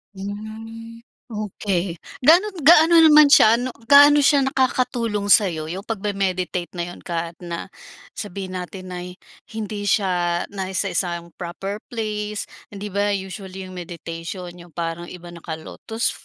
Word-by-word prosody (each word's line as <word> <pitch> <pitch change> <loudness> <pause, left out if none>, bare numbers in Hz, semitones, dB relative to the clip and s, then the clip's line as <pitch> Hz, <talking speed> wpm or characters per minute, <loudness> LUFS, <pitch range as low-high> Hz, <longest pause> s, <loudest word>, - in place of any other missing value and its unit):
Mm, 220 +3 -8 0.3
okey. 195 -4 -2 0.2
Gaano 345 +10 +5
gaano 330 +2 +7
naman 305 -2 +7
siya 220 -4 +7
ano, 245 +2 -3 0.2
gaano 290 +1 +8
siya 285 -1 +4
nakakatulong 245 -6 0
sayo, 165 -6 +3
yung 190 +3 -7
pag 220 -3 -4
me-meditate 185 -3 -1
na 175 - -2
'yon, 175 +1 -8
kahit 170 -1 -5
na, 170 -1 -6 0.4
sabihin 190 -3 -6
natin 185 +1 -8
na 180 - -5 0.6
hindi 210 -1 -4
siya 175 -4 +1
nasa 190 0 -2
isang 170 -2 -2
proper 195 +4 -5
place. 210 -2 -3 0.2
Hindi 205 0 -8
ba 205 +2 0
usually 190 0 -7
'yong 185 - -10
meditation 175 0 -7
yong 175 -1 -15
parang 170 0 -4
iba 175 -1 -10
naka-lotus, 170 +7 -4
195 Hz, 135 wpm, -22 LUFS, 175-225 Hz, 0.6 s, gaano